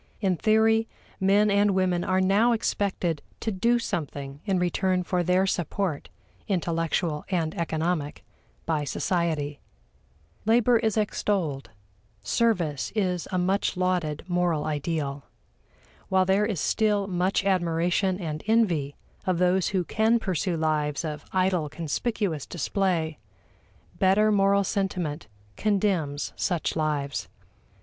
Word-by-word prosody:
In 190 -4 +1
theory, 220 +3 +3 0.3
men 200 +2 +4
and 200 -1 +3
women 180 -2 +1
are 185 - +1
now 200 +6 +4
expected 190 -7 -1 0.2
to 220 - -2
do 230 +5 +2
something 145 -9 -4
in 195 -3 +1
return 180 +1 +1
for 180 0 0
their 180 +2 +2
support 180 -3 -2 0.4
intellectual 165 -3 -1
and 165 -4 0
economic 160 -2 -2 0.4
by 155 -3 0
society. 155 -3 -1 0.8
Labor 235 +1 +4
is 220 -2 0
extolled; 190 -9 -1 0.5
service 175 - 0
is 180 -5 0
a 185 - 0
much 190 +1 0
lauded 180 -5 0
moral 175 -4 0
ideal. 145 -2 -2 0.8
While 190 -1 +3
there 195 +3 +2
is 205 -7 -2
still 210 +1 +1
much 190 +1 0
admiration 180 +1 +1
and 155 -4 -4
envy 175 -11 +2 0.3
of 185 -2 +2
those 180 +1 +2
who 190 -2 0
can 220 +6 +2
pursue 185 -4 -1
lives 155 -1 0
of 150 -1 -5
idle 185 -4 +1
conspicuous 165 - -2
display, 170 -2 -1 0.8
better 205 +3 +4
moral 200 0 +3
sentiment 180 - -2 0.3
condemns 190 -9 0
such 175 -4 -1
lives. 150 -3 -1
180 Hz, 120 wpm, -26 LUFS, 160-200 Hz, 0.8 s, men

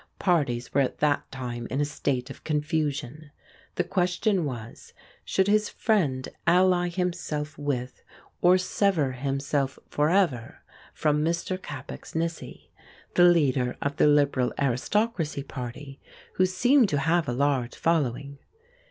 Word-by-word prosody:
Parties 140 -10 0
were 140 - +4
at 130 - -1
that 150 -1 0
time 120 -3 -5
in 130 +5 -2
a 145 - +2
state 135 -3 -2
of - - -12
confusion. 150 -1 -2 0.5
The 180 - +1
question 180 +1 0
was, 115 -5 -8 0.3
should 190 0 +1
his 210 0 +2
friend 150 - 0 0.2
ally 180 0 +4
himself 170 -4 -3
with 130 -4 -3 0.4
or 180 +1 +6
sever 185 -6 +1
himself 135 +1 -2
for 150 +1 +2
ever 165 - 0 0.3
from 150 -1 +1
Mr. 170 +3 -1
Capax 145 -7 -9
Nissy, 165 0 -4 0.4
the 175 - +6
leader 140 -8 +3
of 140 +1 -3
the - - +5
Liberal 140 -4 +3
Aristocracy 150 - 0
Party, 135 +1 -8 0.3
who 185 - +3
seemed 240 +5 +3
to 145 - 0
have 160 +2 +1
a - - 0
large 130 -2 0
following? 140 -3 -1
150 Hz, 135 wpm, -26 LUFS, 135-175 Hz, 0.5 s, or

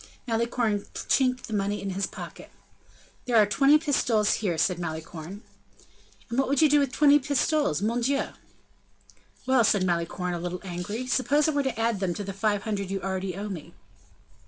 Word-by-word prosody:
Malicorne 230 -2 0 0.2
chinked 255 -1 +2
the 220 - -7
money 205 0 -1
in 195 - -4
his 195 +1 -1
pocket. - - -10 0.8
"There 245 - 0
are 215 - +7
twenty 275 +9 +5
pistoles 250 -9 +1
here," 180 -6 -1
said 175 +2 +1
Malicorne. 165 +3 -6 0.8
"And 235 - -2
what 270 - +2
would 280 0 +1
you 315 - +6
do 295 0 +4
with 280 -3 0
twenty 290 +2 +5
pistoles, 285 - 0
mon 235 +3 0
Dieu!" 275 +3 0 1.2
"Well!" 260 -2 +4
said 205 -2 +3
Malicorne, 175 +1 -1
a 175 - -3
little 180 +1 -4
angry, 195 +6 -4
"suppose 275 +4 +2
I - - +2
were 290 -1 +1
to 265 -5 -3
add 225 -2 +1
them 185 -3 -1
to 205 - -4
the 195 0 -5
five 205 0 0
hundred 200 -4 -3
you 195 0 -2
already 190 -1 -3
owe 205 +2 -5
me?" 170 -3 -8
210 Hz, 180 wpm, -26 LUFS, 185-255 Hz, 1.2 s, are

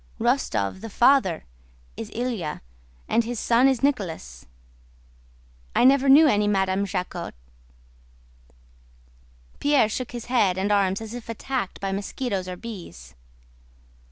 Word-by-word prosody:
Rostóv, 190 - 0
the 225 - -7
father, 230 - +3 0.5
is 110 - -7
Ilyá, 225 -10 -3 0.5
and 230 - +2
his 235 0 -4
son 240 +3 +4
is 265 -1 +1
Nicholas. 175 - -2 1.3
I - - +4
never 270 +1 +5
knew 295 +4 +8
any 210 -8 +3
Madame 195 0 +1
Jacquot." 180 - -4 2.2
Pierre 285 -7 +3
shook 250 +3 -4
his 240 -1 -6
head 210 -7 +2
and 195 +2 0
arms 195 0 +2
as 220 0 -7
if 240 -2 -8
attacked 235 -2 -4
by 195 -1 -3
mosquitoes 200 0 -3
or 180 - -5
bees. 175 - -10
215 Hz, 125 wpm, -24 LUFS, 190-250 Hz, 2.2 s, knew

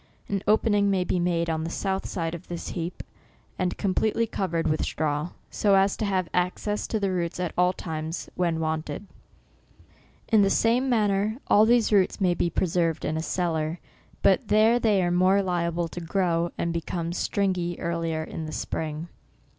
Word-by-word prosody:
An 195 -1 -1
opening 205 -1 +3
may 190 -2 +2
be 180 - -1
made 170 -1 +1
on 160 -1 -1
the 165 - -3
south 190 +2 -2
side 165 -3 -3
of 170 +1 -8
this 175 -1 -5
heap, 170 0 -5 0.6
and 180 -1 -1
completely 220 +3 +1
covered 170 -6 -2
with 155 - 0
straw, 150 +1 -1 0.2
so 200 -2 +3
as 195 0 +3
to 215 - -2
have 190 -3 0
access 180 +4 -1
to 220 - -1
the 200 -2 0
roots 175 -1 -2
at 180 -2 -2
all 180 0 +4
times, 160 -2 -5
when 170 -2 0
wanted. 155 +2 -3 1.2
In 220 -3 +5
the 195 - +4
same 240 +6 +2
manner 210 -2 +1
all 215 +2 +5
these 235 -2 +3
roots 190 -2 +3
may 185 -3 +3
be 175 - 0
preserved 165 -1 0
in 155 - -1
a 160 - -1
cellar, 165 -1 -1 0.4
but 190 - +3
there 220 +3 +4
they 210 -5 +3
are 175 - +1
more 185 +3 +4
liable 170 -2 -1
to 175 - -7
grow, 170 -1 0
and 170 0 -1
become 170 0 -3
stringey 180 -3 -1
earlier 165 -2 -2
in 160 0 -6
the - - -6
spring. 155 +1 -4
180 Hz, 180 wpm, -26 LUFS, 165-200 Hz, 1.2 s, In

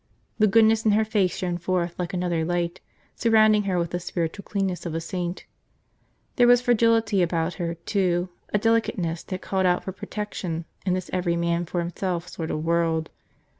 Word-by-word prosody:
The 215 - +5
goodness 220 +1 +4
in 215 - +3
her 220 +1 +3
face 205 -4 +1
shone 175 -1 -2
forth 175 0 -1
like 175 -1 -2
another 175 -3 -1
light, 175 +1 -2 0.3
surrounding 215 -2 +4
her 190 -2 0
with 170 -1 -1
the 175 - -2
spiritual 175 +1 -3
cleanness 195 -3 -2
of 160 - -4
a - - 0
saint. 175 +1 -4 0.9
There 245 -2 +6
was 245 0 +7
fragility 230 -4 +3
about 170 0 0
her, 170 -1 -2
too, 180 0 0 0.2
a - - +3
delicateness 205 -7 0
that 185 -1 -6
called 190 -1 +1
out 180 0 +2
for 190 - -4
protection 185 -4 -5 0.2
in 180 - +3
this 185 -1 -5
every 175 -2 +1
man 170 0 0
for 180 - -4
himself 175 0 -3
sort 165 -2 -5
of 155 +1 -3
world. 165 -1 +1
180 Hz, 180 wpm, -25 LUFS, 170-210 Hz, 0.9 s, was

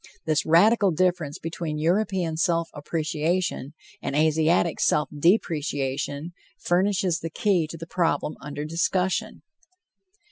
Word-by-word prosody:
This 155 -2 0
radical 200 +6 +5
difference 175 -3 0
between 165 -1 -4
European 175 0 0
self 170 0 0
appreciation 155 0 -2 0.3
and 140 - -3
Asiatic 160 +2 +2
self 150 0 +2
depreciation 145 -3 0 0.3
furnishes 185 -1 +1
the 165 - -5
key 175 -1 +1
to 165 - -8
the 165 - -7
problem 165 -3 -1
under 145 +1 -5
discussion. 175 +3 -1
165 Hz, 110 wpm, -25 LUFS, 150-180 Hz, 0.3 s, radical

